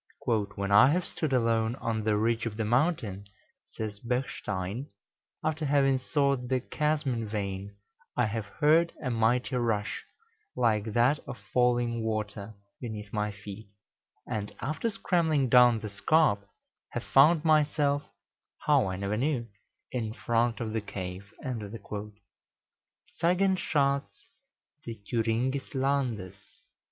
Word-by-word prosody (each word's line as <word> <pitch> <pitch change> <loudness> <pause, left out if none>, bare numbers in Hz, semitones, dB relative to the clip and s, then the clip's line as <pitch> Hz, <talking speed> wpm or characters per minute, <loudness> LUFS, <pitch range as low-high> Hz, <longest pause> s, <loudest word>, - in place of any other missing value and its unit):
"When 100 -3 -1
I 105 +4 +8
have 180 0 0
stood 155 -4 -3
alone 115 -2 +2
on 115 -4 -2
the 105 -1 +2
ridge 115 +2 +1
of 105 -2 -5
the 110 - -1
mountain," 120 - 0 0.5
says 105 -2 -4
Bechstein, 115 -2 -3 0.6
"after 155 0 -1
having 135 -2 +3
sought 140 -1 0
the 130 0 +1
chasm 150 +1 0
in 115 -2 -3
vain, 100 -1 -4 0.4
I - - +4
have 110 -1 -3
heard 160 +8 +3
a 130 - -2
mighty 120 +3 +1
rush, 110 -4 -1 0.5
like 110 -3 +2
that 125 +6 +3
of 125 - -6 0.2
falling 120 -1 +2
water, 110 -1 -3 0.2
beneath 110 -4 -7
my 105 -1 0
feet, 105 0 -10 0.6
and 105 -1 -3
after 155 - -1
scrambling 160 - +1
down 120 -2 +6
the 110 - -5
scarp, 100 -1 +2 0.4
have - - -3
found 155 +4 +5
myself 150 -2 +3 0.6
how, - - +4
I 95 - -2
never 100 +2 -2
knew 125 -2 -1 0.4
in 110 -3 -2
front 115 0 +1
of 110 -2 -3
the 110 - 0
cave." 95 0 -7
("Sagenschatz 140 - -3 0.5
des 115 - -6
Thüringes 115 +6 -1
landes," 125 -9 -1
1835.) - - -29
115 Hz, 125 wpm, -29 LUFS, 105-140 Hz, 0.6 s, I